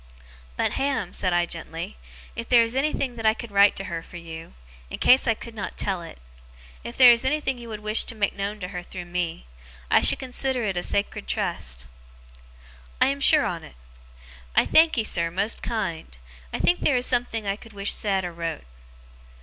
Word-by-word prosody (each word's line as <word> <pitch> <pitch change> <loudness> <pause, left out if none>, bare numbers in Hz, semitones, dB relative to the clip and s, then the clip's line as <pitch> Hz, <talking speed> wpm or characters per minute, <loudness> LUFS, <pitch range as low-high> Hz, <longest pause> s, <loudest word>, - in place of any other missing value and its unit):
'But, - - +1
Ham,' 270 -10 -1
said 185 - -1
I, 175 0 +2
gently, 165 - -7 0.4
'if 230 - -6
there 240 -2 +6
is 230 +2 -2
anything 270 -3 -1
that 225 - -5
I 220 - +4
could 235 -2 -8
write 200 0 +5
to 195 - -3
her, 170 -3 -5
for 175 - -11
you, 165 -1 -10 0.3
in - - -6
case 255 +1 +5
I 230 - +3
could 230 +1 -10
not 210 -3 -6
tell 190 -3 -1
it; 165 - -10 0.7
if 235 - -8
there 250 -2 +9
is 235 -1 +3
anything 270 -2 0
you 235 -1 -10
would 215 -1 -6
wish 215 +1 +1
to 230 - -7
make 205 -2 0
known 205 +1 -4
to 180 - -4
her 180 -2 -5
through 175 0 -8
me; 175 - -3 0.5
I - - +6
should - - +6
consider 260 -1 -1
it 195 -3 -1
a 175 - -1
sacred 200 - -2
trust.' - - -2 1.1
'I - - +5
am 280 0 -2
sure 300 +2 +5
on't. 165 - -5 0.8
I - - +5
thankee, 315 -8 +4
sir, 170 -5 +2
most 200 +6 -1
kind! 170 - -4 0.3
I - - -3
think 355 - +2
theer 280 - +2
is 250 0 +2
something 240 -3 +1
I 195 0 0
could 225 +1 -15
wish 200 0 0
said 195 -3 0
or 175 - -5
wrote. 165 - -4
205 Hz, 200 wpm, -24 LUFS, 175-240 Hz, 1.1 s, there